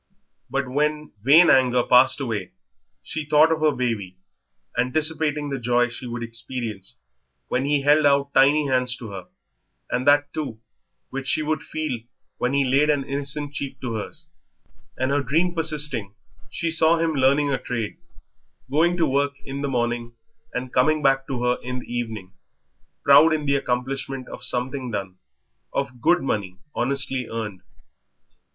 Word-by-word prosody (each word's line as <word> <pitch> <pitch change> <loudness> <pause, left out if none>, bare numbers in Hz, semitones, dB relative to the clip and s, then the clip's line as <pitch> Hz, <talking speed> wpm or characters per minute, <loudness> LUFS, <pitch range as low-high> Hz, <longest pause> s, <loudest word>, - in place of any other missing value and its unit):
But 140 -1 -1
when 150 +3 -1
vain 155 +9 +7
anger 125 -2 +4
passed 130 +3 +5
away 115 -6 -4 0.5
she 155 - -4
thought 150 +2 +4
of 160 - +1
her 155 -1 +3
baby, 115 -8 -3 0.6
anticipating 150 +3 +1
the 135 - -2
joy 120 0 +2
she 120 +1 -7
would 120 0 -5
experience 115 -3 -5 0.5
when 130 - 0
he 145 -1 +1
held 145 +1 +5
out 140 0 +2
tiny 145 +3 +5
hands 125 -2 +1
to 115 -4 -9
her, 95 -2 -8 0.6
and 130 +2 -1
that, 145 0 +4
too, 140 -8 -4 0.5
which 135 0 -5
she 155 - +1
would 155 +1 -1
feel 155 -6 -4 0.4
when 125 +2 0
he 140 -1 +2
laid 140 +4 +3
an 145 -2 +2
innocent 140 +1 -4
cheek 140 -2 -5
to 125 -3 -3
hers; 110 -2 -6 0.7
and 130 +2 0
her 145 0 +2
dream 165 +7 +1
persisting, 150 - +1 0.3
she 165 -1 -2
saw 160 0 +3
him 165 -1 0
learning 140 +1 +3
a 135 - 0
trade, 120 -4 -4 0.7
going 170 +5 +2
to 165 - +3
work 140 0 +1
in 140 0 -5
the 140 - -2
morning 120 -2 -2 0.4
and 125 0 -5
coming 155 +4 +2
back 135 -1 +2
to 125 -3 -3
her 125 0 +1
in 125 +1 -4
the 125 - -8
evening, 110 -6 -4 0.7
proud 150 +3 +7
in 150 -1 -4
the 140 - +2
accomplishment 135 0 -2
of - - -9
something 130 +1 -2
done, 100 -4 -5 0.5
of 130 -3 -3
good 175 +8 +3
money 100 -8 -2 0.2
honestly 135 -1 0
earned. 105 -5 -5
135 Hz, 160 wpm, -23 LUFS, 125-145 Hz, 0.7 s, vain